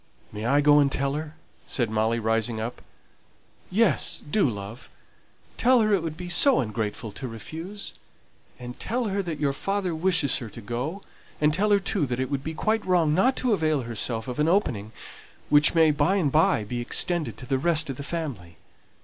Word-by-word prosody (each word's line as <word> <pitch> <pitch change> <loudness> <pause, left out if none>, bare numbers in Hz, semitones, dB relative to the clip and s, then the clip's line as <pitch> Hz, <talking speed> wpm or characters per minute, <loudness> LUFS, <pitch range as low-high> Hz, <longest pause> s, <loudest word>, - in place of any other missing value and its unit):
"May 105 +2 -4
I 140 +3 +4
go 145 0 +6
and 140 -1 +3
tell 135 0 0
her?" 155 +1 -5 0.3
said 120 -4 -1
Molly, 110 +1 +1
rising 115 0 -1
up. 115 +2 -5 0.9
"Yes, 205 -3 +1
do, 170 -2 +2
love. 105 +3 -8 0.7
Tell 255 0 +5
her 215 -1 +2
it 195 - +3
would 160 -1 -5
be 180 +1 -6
so 255 +9 +5
ungrateful 110 0 -3
to 130 +6 -6
refuse; 165 - -6 0.6
and 125 0 -9
tell 245 +4 -2
her 200 -1 -1
that 165 -5 -5
your 140 -2 +1
father 195 +2 -2
wishes 165 -4 +1
her 115 - -7
to 115 - -10
go; 125 - -4 0.4
and 150 0 +3
tell 205 +6 +1
her, 205 - +5
too, 190 -5 0
that 125 0 -3
it 130 +2 -2
would 140 -1 -2
be 160 0 -5
quite 220 +5 0
wrong 175 -5 +2
not 250 +11 +3
to 250 -3 +1
avail 155 -7 +1
herself 115 0 -3
of 125 +2 -5
an 150 - +2
opening 115 - 0 0.6
which 150 +2 +5
may 160 -2 +5
by 150 +6 +1
and 165 -8 +1
by 160 - +3
be 120 +3 -4
extended 170 +6 0
to 130 - -8
the 130 +1 0
rest 160 +1 +1
of 135 -3 -5
the - - -6
family. 130 - -5
150 Hz, 195 wpm, -25 LUFS, 120-180 Hz, 0.9 s, go